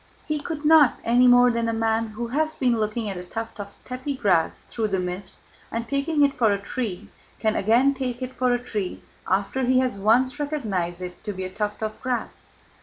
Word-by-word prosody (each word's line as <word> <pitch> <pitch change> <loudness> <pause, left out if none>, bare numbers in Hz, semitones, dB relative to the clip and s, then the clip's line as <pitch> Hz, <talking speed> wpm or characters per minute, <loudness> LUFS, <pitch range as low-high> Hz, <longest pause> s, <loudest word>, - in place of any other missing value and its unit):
He 305 -1 0
could 300 0 -5
not, 300 -4 +6
any 245 +2 +4
more 245 0 +7
than 230 -1 0
a - - -1
man 225 0 +1
who 225 +2 -5
has 310 +4 0
been 245 -3 +2
looking 215 +1 -1
at 195 -2 -4
a 180 - -6
tuft 225 +4 -6
of 200 -1 -5
steppe 255 +6 -5
grass 175 -6 +1
through 225 -2 -2
the 195 -2 0
mist 180 +1 -4 0.3
and 230 0 -3
taking 285 +2 +2
it 280 - 0
for 230 -5 +3
a 200 - +2
tree 200 -1 -4 0.3
can 220 -1 +1
again 240 +7 +4
take 255 -2 -4
it 255 0 -5
for 255 -1 +1
a 245 - +3
tree 215 -6 -4 0.2
after 195 +7 0
he 255 +1 +3
has 255 -5 +1
once 255 +7 +3
recognized 200 - -2
it 180 0 -8
to 210 -2 -3
be 190 0 -5
a 185 - -5
tuft 210 +1 -3
of 215 0 -4
grass. 250 -1 -3
230 Hz, 215 wpm, -24 LUFS, 205-255 Hz, 0.3 s, more